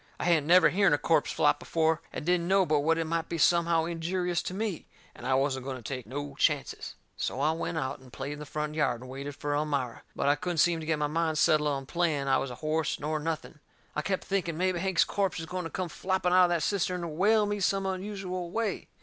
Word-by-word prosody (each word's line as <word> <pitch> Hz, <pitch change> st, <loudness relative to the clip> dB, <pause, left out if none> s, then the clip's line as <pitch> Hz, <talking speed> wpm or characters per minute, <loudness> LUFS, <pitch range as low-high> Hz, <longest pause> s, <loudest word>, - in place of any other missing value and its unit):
I -, -, -3 dB
hadn't 165 Hz, -4 st, +2 dB
never 170 Hz, -2 st, +6 dB
hearn 195 Hz, 0 st, +4 dB
a -, -, +4 dB
corpse 160 Hz, 0 st, +2 dB
flop -, -, +2 dB
before, 160 Hz, 0 st, +1 dB
and -, -, -6 dB
didn't 175 Hz, 0 st, +2 dB
know 195 Hz, 0 st, +4 dB
but 155 Hz, -3 st, +2 dB
what 165 Hz, +3 st, +2 dB
it 165 Hz, -, 0 dB
might 165 Hz, 0 st, -2 dB
be 170 Hz, -, -2 dB
somehow 170 Hz, +1 st, +3 dB
injurious 175 Hz, +1 st, -1 dB
to -, -, -5 dB
me, 210 Hz, -5 st, -3 dB, 0.3 s
and 125 Hz, -, -8 dB
I 130 Hz, -, +3 dB
wasn't 135 Hz, -1 st, 0 dB
going 135 Hz, 0 st, -4 dB
to 120 Hz, -, -12 dB
take 125 Hz, -1 st, -5 dB
no 145 Hz, +3 st, -5 dB
chances. 145 Hz, 0 st, -1 dB, 0.2 s
So 125 Hz, -, -3 dB
I 150 Hz, +3 st, +3 dB
went 165 Hz, +1 st, -3 dB
out 140 Hz, -1 st, -2 dB
and 130 Hz, -1 st, -16 dB
played 140 Hz, +3 st, -5 dB
in 150 Hz, -, -9 dB
the 150 Hz, -, -8 dB
front 150 Hz, 0 st, -3 dB
yard, 130 Hz, -6 st, 0 dB
and 130 Hz, -, -10 dB
waited 140 Hz, +2 st, -6 dB
fur 145 Hz, 0 st, -3 dB
Elmira. 145 Hz, -5 st, -1 dB
But -, -, -1 dB
I 145 Hz, -, +6 dB
couldn't 175 Hz, +3 st, -3 dB
seem 170 Hz, +1 st, +3 dB
to 155 Hz, -, -7 dB
get 160 Hz, -1 st, +1 dB
my 150 Hz, -, 0 dB
mind 160 Hz, +1 st, 0 dB
settled 150 Hz, -1 st, +4 dB
on 135 Hz, -1 st, -2 dB
playing 155 Hz, -3 st, 0 dB
I 135 Hz, -1 st, +3 dB
was 135 Hz, -, -3 dB
a 125 Hz, -, -7 dB
horse, 155 Hz, 0 st, 0 dB
nor 155 Hz, +2 st, -2 dB
nothing. 160 Hz, 0 st, -4 dB, 0.4 s
I 150 Hz, -, 0 dB
kep' 190 Hz, +4 st, -2 dB
thinking 180 Hz, -5 st, -1 dB
mebby 185 Hz, 0 st, +1 dB
Hank's 190 Hz, -1 st, +3 dB
corpse 195 Hz, -4 st, -1 dB
is 165 Hz, -, -5 dB
going 180 Hz, +1 st, -4 dB
to -, -, -4 dB
come 185 Hz, +1 st, -3 dB
flopping 185 Hz, +1 st, -1 dB
out 185 Hz, 0 st, +7 dB
of -, -, 0 dB
that 170 Hz, -3 st, +1 dB
cistern 180 Hz, -2 st, 0 dB
and 160 Hz, -3 st, -5 dB
whale 210 Hz, +4 st, +4 dB
me 205 Hz, 0 st, -2 dB
some 195 Hz, 0 st, +1 dB
unusual 190 Hz, -2 st, -4 dB
way. 215 Hz, +1 st, -2 dB
165 Hz, 250 wpm, -29 LUFS, 145-180 Hz, 0.4 s, out